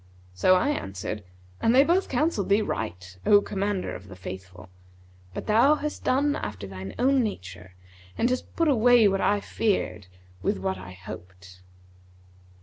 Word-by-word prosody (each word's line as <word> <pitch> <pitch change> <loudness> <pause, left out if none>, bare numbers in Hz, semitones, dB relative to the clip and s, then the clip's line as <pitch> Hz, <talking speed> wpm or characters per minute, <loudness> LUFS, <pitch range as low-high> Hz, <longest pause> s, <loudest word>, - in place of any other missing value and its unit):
So 185 - +4
I 185 +10 +2
answered, 100 - -4 0.4
'And 230 - +3
they 270 - +8
both 350 +5 +1
counselled 265 - 0
thee 205 +2 +4
right, 90 - -5
O 205 - +6
Commander 200 -1 -2
of 95 +2 -9
the 95 - -10
Faithful, 95 0 -9 0.6
but - - -6
thou 235 +8 +5
hast 300 0 -5
done 285 +3 +2
after 105 -1 -5
thine 95 0 -8
own 265 +2 +3
nature 95 - -6 0.4
and 235 - +2
hast 255 0 -3
put 330 - +2
away 245 -4 +5
what 195 0 +1
I 205 - +2
feared 195 - -1 0.3
with - - 0
what 95 0 -2
I 90 0 -9
hoped.' 90 0 -11
185 Hz, 155 wpm, -26 LUFS, -, 0.6 s, they